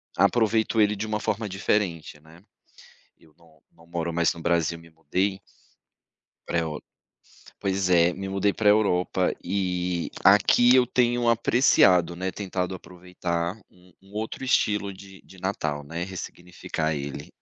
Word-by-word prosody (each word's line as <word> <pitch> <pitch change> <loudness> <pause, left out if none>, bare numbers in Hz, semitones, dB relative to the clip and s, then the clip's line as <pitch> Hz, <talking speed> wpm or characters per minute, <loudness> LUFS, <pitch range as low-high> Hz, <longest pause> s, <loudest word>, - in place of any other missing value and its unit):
aproveito 110 -1 +2
ele 105 0 +3
de 110 +2 -4
uma 105 0 -2
forma 105 0 -2
diferente, 95 -5 -2
né. 80 +4 -18 0.8
Eu 80 -2 -24
não 85 -2 -24
não 80 - -21
moro 85 0 -3
mais 85 0 +1
no 85 - -10
Brasil, 85 -1 0
me 85 0 -17
mudei 95 +4 -2 1.1
pra 85 - 0
Eur 80 -2 -4 0.8
pois 95 -1 -1
é, 85 -1 +4
me 95 +1 -6
mudei 100 +1 +1
para 105 -2 +2
a - - +8
Europa, 95 -3 +1
e 90 -2 -2
aqui 110 +5 +6
eu 125 -1 +5
tenho 120 -1 +1
apreciado, 110 -7 +4
né, 95 +2 -3
tentado 95 -2 -3
aproveitar 90 0 -4
um 90 0 -23
um 95 +1 -20
outro 110 +4 -5
estilo 105 -6 +1
de 95 0 -14
de 95 - -16
Natal, 80 -6 -3
né, 85 +4 -5
ressignificar 90 -3 -5
ele. 70 -1 -6
90 Hz, 150 wpm, -25 LUFS, 85-105 Hz, 1.1 s, a